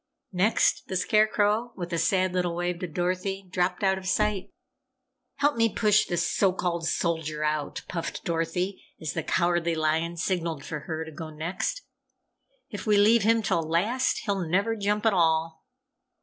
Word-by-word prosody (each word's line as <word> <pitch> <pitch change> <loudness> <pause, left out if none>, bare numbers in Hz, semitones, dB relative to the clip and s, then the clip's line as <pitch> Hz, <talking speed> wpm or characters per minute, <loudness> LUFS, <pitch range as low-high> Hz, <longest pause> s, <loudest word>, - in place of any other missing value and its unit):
Next, 190 +5 +2
the 190 - -4
Scarecrow, 215 +3 +2
with 175 -2 -5
a 170 - +1
sad 185 +2 +2
little 180 -2 0
wave 175 0 -2
to 180 - -3
Dorothy, 185 +3 -2
dropped 180 +1 -1
out 190 -1 +2
of 185 - -9
sight. 210 0 0 0.9
"Help 290 -2 +1
me 230 0 +4
push 210 -1 +3
this 175 -1 0
so 195 -2 +2
called 170 -3 -2
Soldier 160 -3 -1
out!" 150 -1 -2
puffed 165 -3 -5
Dorothy, 170 +3 -2 0.2
as 155 - -4
the - - -1
Cowardly 175 -1 +1
Lion 160 +2 0
signalled 165 -4 -2
for 150 - -4
her 160 +1 -5
to 160 - -9
go 160 +1 -7
next. 165 - -3 0.9
"If - - -6
we 210 -1 +4
leave 220 +3 +5
him 225 +2 +3
till 190 -4 +1
last 185 +11 +1
he'll 200 -3 0
never 200 +7 +1
jump 210 +1 -1
at 220 - +4
all!" 160 -2 +1
180 Hz, 165 wpm, -27 LUFS, 165-205 Hz, 0.9 s, leave